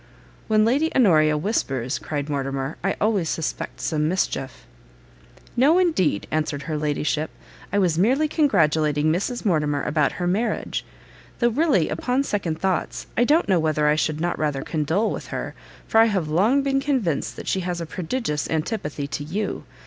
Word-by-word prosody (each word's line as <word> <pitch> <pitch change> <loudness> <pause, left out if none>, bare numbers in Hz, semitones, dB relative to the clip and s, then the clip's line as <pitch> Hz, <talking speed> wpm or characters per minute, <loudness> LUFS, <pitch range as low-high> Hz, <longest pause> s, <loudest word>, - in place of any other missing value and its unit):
"When 215 -1 +4
Lady 285 +8 +2
Honoria 155 -10 +4
whispers," 135 - -1
cried 145 -2 -4
Mortimer, 135 0 -2
"I 195 - 0
always 205 -6 +1
suspect 160 - -3
some 155 -1 0
mischief." 135 -7 -2 0.9
"No 285 +8 +5
indeed," 310 - +2
answered 150 -2 -1
her 155 - -3
ladyship, 150 +1 -1 0.4
"I 200 - 0
was 175 -5 +2
merely 265 - +3
congratulating 155 - +2
Mrs 225 +9 -2
Mortimer 150 -6 +1
about 150 -2 +1
her 180 - -3
marriage. 200 +7 -1 0.5
Though 240 - +3
really, 270 - +2
upon 255 +2 0
second 175 - -2
thoughts, 190 0 -1
I 240 - +3
don't 305 +6 +3
know 190 -3 +3
whether 155 -1 +1
I 150 - +4
should 155 0 -1
not 175 +1 -1
rather 145 -3 -1
condole 160 +8 0
with - - -5
her, - - -5 0.3
for 225 - +3
I 225 - +8
have 195 -8 0
long 210 - +3
been 275 0 +1
convinced 250 - -1
she 190 - 0
has 175 -1 -3
a 170 - -3
prodigious 165 - -3
antipathy 155 -3 -2
to 145 +1 -4
you. 195 +8 -3
170 Hz, 165 wpm, -23 LUFS, 150-225 Hz, 0.9 s, I